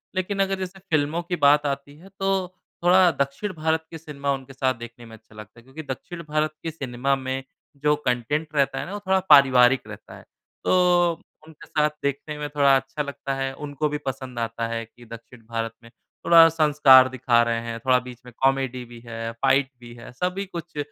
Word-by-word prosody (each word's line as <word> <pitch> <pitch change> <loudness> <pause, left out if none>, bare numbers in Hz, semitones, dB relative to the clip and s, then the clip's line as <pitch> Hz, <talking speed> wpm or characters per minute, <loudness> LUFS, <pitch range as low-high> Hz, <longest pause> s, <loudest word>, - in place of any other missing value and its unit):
लेकिन 185 +2 -2
अगर 195 0 -2
जैसे 190 +1 -6
फ़िल्मों 160 -2 -1
की 180 +1 -3
बात 145 -1 +4
आती 140 0 -4
है 190 +4 -16
तो 195 -1 0 0.4
थोड़ा 180 0 +6
दक्षिण 140 +9 -2
भारत 160 0 -1
के 165 - -7
सिनेमा 140 -3 -4
उनके 135 0 -8
साथ 130 -1 0
देखने 120 0 -10
में 115 - -12
अच्छा 110 0 -23
लगता 105 +2 -12
है। - - -19
क्योंकि 135 +5 -10
दक्षिण 170 +6 -10
भारत 155 0 0
के 165 - -3
सिनेमा 135 -2 -1
में 130 0 -4 0.4
जो 150 0 +4
कॉन्टेन्ट 145 +6 -1
रहता 140 -1 +1
है - - -4
ना 195 - -8
वो 205 - -4
थोड़ा 190 0 +3
पारिवारिक 135 -3 +6
रहता - - -11
है। - - -15 0.4
तो 175 -1 +3 0.4
उनके 160 -2 -15
साथ 150 0 +1
देखने 140 +2 -3
में 150 - -3
थोड़ा 140 -2 +4
अच्छा 135 +3 -5
लगता 140 -1 -5
है। 135 0 -3
उनको 145 +1 -3
भी 150 - -2
पसंद 130 -2 -5
आता 115 0 -3
है 115 0 -3
कि 120 +2 -19
दक्षिण 115 0 -13
भारत 115 0 -4
में 115 - -15 0.3
थोड़ा 165 -1 +8
संस्कार 145 -5 +6
दिखा 120 -2 +2
रहे 115 -1 -1
हैं 115 0 -6
थोड़ा 130 +2 +3
बीच 125 0 -10
में 125 - -11
कॉमेडी 135 -2 +1
भी 120 0 -13
है 115 0 -5
फाइट 135 0 +3
भी 120 -1 -12
है। 115 - -12
सभी 180 +8 -3
कुछ 170 -3 -9
140 Hz, 205 wpm, -24 LUFS, 125-160 Hz, 0.4 s, थोड़ा